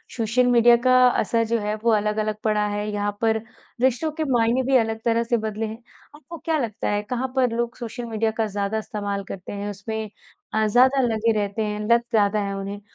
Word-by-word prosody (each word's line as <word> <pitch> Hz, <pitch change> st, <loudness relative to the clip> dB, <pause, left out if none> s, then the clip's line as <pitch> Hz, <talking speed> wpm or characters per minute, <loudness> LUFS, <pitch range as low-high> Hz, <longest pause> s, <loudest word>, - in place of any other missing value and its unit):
Social 240 Hz, +2 st, +1 dB
media 240 Hz, 0 st, +6 dB
का 255 Hz, -, +5 dB, 0.3 s
असर 230 Hz, +2 st, +1 dB
जो 230 Hz, 0 st, +1 dB
है 210 Hz, 0 st, -2 dB
वो 235 Hz, -, +3 dB
अलग-अलग 215 Hz, 0 st, 0 dB
पड़ा 210 Hz, -1 st, +1 dB
है? 205 Hz, 0 st, -3 dB
यहाँ 205 Hz, 0 st, -2 dB
पर 220 Hz, -1 st, +2 dB, 0.4 s
रिश्तों 260 Hz, +5 st, +1 dB
के 315 Hz, +1 st, -3 dB
मायने 240 Hz, +1 st, +2 dB
भी 265 Hz, +1 st, +1 dB
अलग 225 Hz, -2 st, 0 dB
तरह 230 Hz, 0 st, +2 dB
से 235 Hz, 0 st, 0 dB
बदले 220 Hz, 0 st, -3 dB
हैं? 220 Hz, 0 st, -6 dB, 0.4 s
आपको 310 Hz, +3 st, -11 dB
क्या 320 Hz, -1 st, -1 dB
लगता 225 Hz, -5 st, -3 dB
है 205 Hz, 0 st, 0 dB
कहाँ 250 Hz, +4 st, -2 dB
पर 255 Hz, -2 st, +2 dB
लोग 235 Hz, 0 st, -2 dB
सोशल 240 Hz, 0 st, -6 dB
मीडिया 225 Hz, -1 st, -1 dB
का 225 Hz, -, +1 dB
ज़्यादा 200 Hz, +1 st, -2 dB
इस्तेमाल 205 Hz, -3 st, -4 dB
करते 185 Hz, -2 st, -7 dB
हैं 205 Hz, 0 st, -4 dB
उसमें 215 Hz, +2 st, -5 dB, 0.4 s
अ, 220 Hz, 0 st, +2 dB
ज़्यादा 255 Hz, +5 st, +4 dB
लगे 230 Hz, -2 st, +1 dB
रहते 205 Hz, +2 st, -2 dB
हैं, 210 Hz, 0 st, -3 dB
लत 235 Hz, 0 st, +5 dB
ज़्यादा 210 Hz, -1 st, +2 dB
हैं 200 Hz, 0 st, -3 dB
उन्हें? 195 Hz, +1 st, -5 dB
220 Hz, 210 wpm, -23 LUFS, 210-240 Hz, 0.4 s, मीडिया